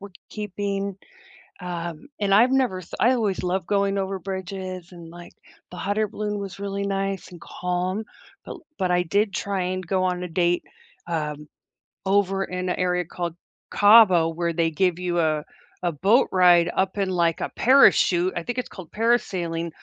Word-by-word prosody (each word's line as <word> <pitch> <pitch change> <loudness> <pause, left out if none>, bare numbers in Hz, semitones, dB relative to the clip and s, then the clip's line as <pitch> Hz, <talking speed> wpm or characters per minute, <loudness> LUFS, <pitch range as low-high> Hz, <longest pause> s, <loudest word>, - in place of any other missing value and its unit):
we're 200 0 -10 0.2
keeping. 200 -1 -3 0.6
Um, 175 - -6
and 200 -1 +1
I've 240 +6 +5
never 255 -9 +1
s 180 - -10
I 245 +3 +5
always 210 -7 -1
loved 180 0 -1
going 200 -1 +1
over 195 0 -2
bridges 190 -1 -6
and, 170 -2 -11
like, 175 0 -12 0.4
the 180 - -10
hot 205 +3 -2
air 215 - +2
balloon 210 0 -4
was 195 -1 -7
really 200 0 -3
nice 195 -1 -2
and 175 - -11
calm. 180 +4 -3 0.4
But - - -6
l - - -11 0.2
but 185 -1 0
I 180 0 +3
did 200 +4 0
try 200 -2 -2
and 185 0 -5
go 185 +1 0
on 180 -1 -1
a 180 - -4
date, 175 +1 +1 0.5
um, 150 -2 -3 0.6
over 195 0 +1
in 180 0 -4
a - - 0
area 180 0 0
called 170 0 -5 0.3
Cabo 205 -6 +6
where 170 +1 -2
they 165 0 +1
give 180 +2 +1
you 175 -1 -1
a 155 -2 +1 0.4
a 175 - +1
boat 200 - +3
ride 175 -2 +5
up 190 +1 0
in, 195 -1 0
like, 170 -2 +1
a - - -2
parachute, 190 -8 +5
I 170 - -2
think 245 +5 -5
it's 250 - -3
called 185 -5 -10
parasailing. 185 -8 0
185 Hz, 180 wpm, -24 LUFS, 175-200 Hz, 0.6 s, Cabo